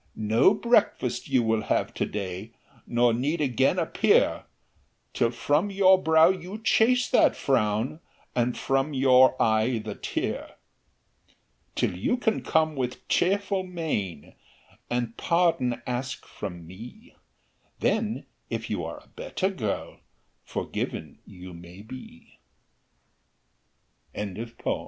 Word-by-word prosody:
"No 110 - +4
breakfast 215 - +1
you 130 -3 +3
will 110 -1 +1
have - - -1
to - - -1
day, 100 +2 -5 0.3
Nor 120 0 +3
need 140 +8 -1
again 130 -6 +2
appear, - - +2 0.7
Till 115 - +2
from 145 - +1
your 190 -1 +5
brow 160 0 +6
you 185 +2 -3
chase 245 +3 +3
that - - +5
frown, 115 +2 0 0.4
And 120 0 +1
from 135 +2 0
your 130 -1 +5
eye 110 +2 +2
the 105 -1 -5
tear. - - -4 1.2
"Till - - 0
you 100 - 0
can 220 -3 0
come 160 -1 +1
with 125 -2 -4
cheerful 195 +1 +1
mien, 160 - -4 0.6
And 120 -1 -2
pardon 160 -9 +1
ask 125 +2 -4
from 90 -5 -7
me; 120 - -12 0.7
Then, 220 0 0 0.2
if - - -4
you - - -2
are - - -7
a - - -25
better 330 - -2
girl, 110 - -4 0.4
Forgiven - - -5
you 90 0 -11
may 85 +3 -12
be." 120 -7 -12 1.8
THE 105 - -2 0.2
CUCKOO. 115 0 -3
130 Hz, 120 wpm, -26 LUFS, 110-180 Hz, 1.8 s, brow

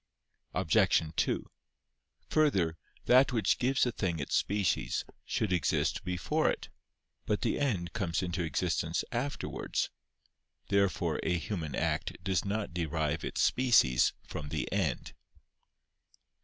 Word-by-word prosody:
Obj. - - +3
2: - - 0 0.8
Further, 95 - +2 0.3
that 130 +2 +6
which 115 -6 +2
gives 130 +2 +2
a 125 - 0
thing 90 -7 -1
its 70 - -2
species 100 -2 0 0.2
should 105 -4 0
exist 90 - +1
before 90 0 0
it. - - -3 0.6
But 105 -1 0
the - - 0
end 100 -12 -1
comes 95 -5 -1
into 90 0 -2
existence 80 -4 0
afterwards. 130 +4 -2 0.8
Therefore 100 -3 +1
a 90 - +1
human 80 -5 -4
act - - -1
does 95 -3 +1
not 105 -2 -2
derive 80 -3 -1
its - - -1
species 115 - +4
from 75 - -6
the - - -2
end. - - -1
95 Hz, 120 wpm, -31 LUFS, 85-115 Hz, 0.8 s, that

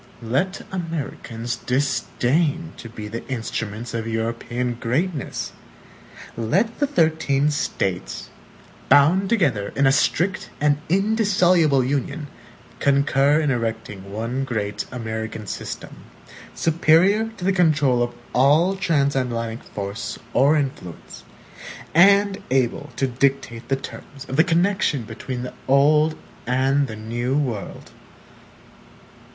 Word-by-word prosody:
Let 140 - -1
Americans 145 -9 -4
disdain 140 +5 0
to 115 - -9
be 110 -2 -7
the 115 +2 -6
instruments 115 -2 -4
of 115 -1 -3
European 115 +2 -2
greatness! 145 +6 -2 0.8
Let 185 - 0
the 285 - +2
thirteen 155 - +2
States, 90 - -3 0.6
bound 175 +7 +5
together 135 - +1
in 140 - +3
a 135 - +6
strict 175 +7 +1
and 145 -1 +2
indissoluble 185 - +3
Union, 140 +3 -2 0.5
concur 140 +1 +3
in 150 -3 +1
erecting 110 -5 -4
one 115 +5 -2
great 105 -5 -3
American 110 -2 -5
system, - - -6 0.6
superior 170 +7 +3
to 180 - -5
the 195 - +3
control 150 -8 +3
of 120 0 -1 0.2
all 150 +9 +4
transatlantic 130 -9 0
force 100 +1 -5 0.2
or 140 +5 +4
influence, 130 - -5 0.7
and 200 +3 +5
able 130 +2 0
to 135 - +1
dictate 125 -2 -1
the 135 - +3
terms 135 0 -9
of 130 - -4
the 160 - +6
connection 175 -6 +1
between 125 +3 -6
the 125 - -6
old 150 +3 +4 0.3
and 135 +3 +2
the 110 - -7
new 120 +5 -2
world! 120 -9 -4
135 Hz, 110 wpm, -22 LUFS, 115-160 Hz, 0.8 s, a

